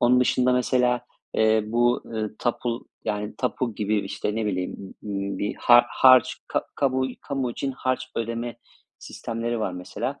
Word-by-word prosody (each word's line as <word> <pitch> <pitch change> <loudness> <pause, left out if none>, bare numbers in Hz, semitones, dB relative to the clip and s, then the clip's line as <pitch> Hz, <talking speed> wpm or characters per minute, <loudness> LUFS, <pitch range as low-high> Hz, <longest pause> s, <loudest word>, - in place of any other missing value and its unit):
Onun 125 +1 +5
dışında 125 0 +3
mesela, 125 -1 +2 0.3
eee, 110 0 +4
bu, 120 +2 +2
ııı, 110 -2 -4
tapu 120 0 -2 0.2
yani, 105 0 -2
tapu 125 -3 -1
gibi, 105 0 0
işte, 100 +1 -3
ne 110 -1 -1
bileyim, 95 0 -4
ımm, 100 -2 -3
ııı, - - -4
bir 105 - -2
har 120 0 +7
harç 130 0 +6
ka - - 0
kamu 130 -1 +1
kamu 135 -3 -2
için 135 +3 -3
harç 130 0 -1
ödeme 115 +1 -3 0.4
sistemleri 115 0 -4
var 95 - -1
mesela. 110 +10 -5
120 Hz, 160 wpm, -25 LUFS, 110-125 Hz, 0.4 s, har